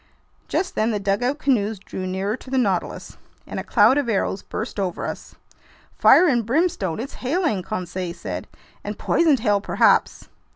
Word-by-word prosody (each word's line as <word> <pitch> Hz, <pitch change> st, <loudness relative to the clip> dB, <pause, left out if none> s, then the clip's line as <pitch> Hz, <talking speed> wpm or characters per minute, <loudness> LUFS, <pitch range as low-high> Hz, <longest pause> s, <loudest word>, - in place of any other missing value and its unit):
Just 370 Hz, -, -1 dB
then 215 Hz, +1 st, +1 dB
the 210 Hz, -3 st, -1 dB
dugout 205 Hz, +8 st, 0 dB
canoes 225 Hz, -8 st, +1 dB
drew 185 Hz, -1 st, -6 dB
nearer 190 Hz, +3 st, -2 dB
to -, -, -13 dB
the 265 Hz, -, -1 dB
Nautilus, 195 Hz, -8 st, -1 dB, 0.3 s
and -, -, -5 dB
a -, -, -4 dB
cloud 230 Hz, +7 st, +4 dB
of 270 Hz, -5 st, -2 dB
arrows 195 Hz, -2 st, 0 dB
burst 220 Hz, -1 st, -5 dB
over 185 Hz, -3 st, -2 dB
us. -, -, -7 dB, 0.6 s
"Fire 360 Hz, -, +6 dB
and 240 Hz, -6 st, +2 dB
brimstone, 230 Hz, -, 0 dB
it's 260 Hz, +4 st, -5 dB
hailing!" 290 Hz, -, 0 dB
Conseil 180 Hz, 0 st, -4 dB
said. -, -, -6 dB, 0.4 s
"And -, -, -5 dB
poisoned 305 Hz, -8 st, +2 dB
hail 205 Hz, -3 st, +2 dB
perhaps!" -, -, +2 dB
215 Hz, 165 wpm, -22 LUFS, 195-265 Hz, 0.6 s, Fire